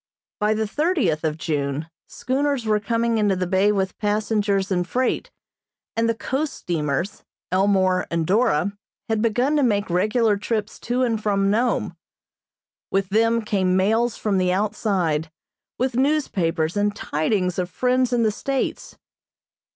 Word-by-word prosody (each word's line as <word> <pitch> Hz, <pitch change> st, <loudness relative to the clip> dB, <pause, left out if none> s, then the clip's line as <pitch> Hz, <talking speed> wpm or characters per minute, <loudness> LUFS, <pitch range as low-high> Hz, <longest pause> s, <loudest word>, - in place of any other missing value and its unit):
By 210 Hz, +1 st, +2 dB
the 220 Hz, 0 st, 0 dB
thirtieth 265 Hz, -, 0 dB
of 155 Hz, -1 st, -1 dB
June 150 Hz, -2 st, -2 dB, 0.2 s
schooners 265 Hz, +1 st, -1 dB
were 215 Hz, -1 st, +2 dB
coming 230 Hz, +2 st, 0 dB
into 205 Hz, -2 st, +2 dB
the 185 Hz, 0 st, -1 dB
bay 190 Hz, +3 st, +3 dB
with 190 Hz, -2 st, -2 dB
passengers 205 Hz, -2 st, 0 dB
and 180 Hz, -1 st, 0 dB
freight, 255 Hz, +5 st, -1 dB, 0.7 s
and 230 Hz, 0 st, +1 dB
the 230 Hz, -, +1 dB
coast 280 Hz, +6 st, -2 dB
steamers, 165 Hz, +2 st, -2 dB, 0.3 s
"Elmore" 185 Hz, -1 st, +2 dB
and 165 Hz, -1 st, -1 dB
"Dora," 200 Hz, -1 st, +2 dB, 0.3 s
had 220 Hz, -1 st, +1 dB
begun 245 Hz, +6 st, +1 dB
to -, -, +3 dB
make 205 Hz, -7 st, +1 dB
regular 210 Hz, +4 st, +2 dB
trips 215 Hz, +1 st, -3 dB
to 250 Hz, +2 st, +2 dB
and 225 Hz, -3 st, 0 dB
from 200 Hz, -2 st, +1 dB
Nome. 235 Hz, +3 st, 0 dB, 0.9 s
With 195 Hz, -1 st, 0 dB
them 230 Hz, +2 st, +2 dB
came 190 Hz, -3 st, +1 dB
mails 225 Hz, +5 st, +2 dB
from 200 Hz, -3 st, 0 dB
the 180 Hz, -1 st, +2 dB
outside, 185 Hz, -6 st, 0 dB, 0.5 s
with 255 Hz, +1 st, 0 dB
newspapers 190 Hz, -, 0 dB
and 205 Hz, 0 st, +1 dB
tidings 180 Hz, +2 st, -1 dB
of 180 Hz, -1 st, -2 dB
friends 250 Hz, +6 st, +1 dB
in 240 Hz, -1 st, +2 dB
the 215 Hz, -, +3 dB
States. 270 Hz, +5 st, -3 dB
210 Hz, 145 wpm, -23 LUFS, 185-230 Hz, 0.9 s, bay